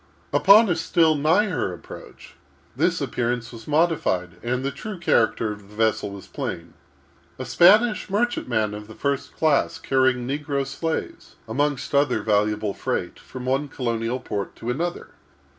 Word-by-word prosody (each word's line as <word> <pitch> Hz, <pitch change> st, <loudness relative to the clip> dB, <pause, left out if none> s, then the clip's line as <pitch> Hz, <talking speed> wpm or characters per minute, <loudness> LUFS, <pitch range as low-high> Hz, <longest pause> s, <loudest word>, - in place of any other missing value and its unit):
Upon 210 Hz, +3 st, +7 dB
a 175 Hz, -, +1 dB
still 165 Hz, 0 st, +3 dB
nigher 160 Hz, -, +1 dB
approach, 90 Hz, -, -11 dB, 0.4 s
this -, -, +1 dB
appearance 120 Hz, -1 st, -2 dB
was 115 Hz, -1 st, -11 dB
modified, 150 Hz, -, +1 dB
and 125 Hz, +2 st, -2 dB
the 140 Hz, -, -1 dB
true 210 Hz, +4 st, -7 dB
character 115 Hz, -8 st, +1 dB
of 105 Hz, -1 st, -10 dB
the 105 Hz, -, -15 dB
vessel 110 Hz, -2 st, +1 dB
was 100 Hz, -1 st, -9 dB
plain—a 85 Hz, -, -9 dB
Spanish 210 Hz, -, +4 dB
merchantman 125 Hz, -, 0 dB
of 105 Hz, 0 st, -8 dB
the 110 Hz, -, -12 dB
first 140 Hz, -1 st, -2 dB
class, 155 Hz, -3 st, +2 dB
carrying 130 Hz, -2 st, +1 dB
negro 140 Hz, 0 st, -2 dB
slaves, 160 Hz, +3 st, -4 dB
amongst 140 Hz, +4 st, -1 dB
other 145 Hz, +1 st, +2 dB
valuable 105 Hz, -1 st, +1 dB
freight, -, -, -3 dB
from 130 Hz, -1 st, -9 dB
one 135 Hz, +3 st, 0 dB
colonial 120 Hz, -2 st, -2 dB
port 100 Hz, -5 st, -5 dB
to 120 Hz, -, -4 dB
another. 170 Hz, +7 st, -3 dB
130 Hz, 140 wpm, -23 LUFS, 110-160 Hz, 0.4 s, Upon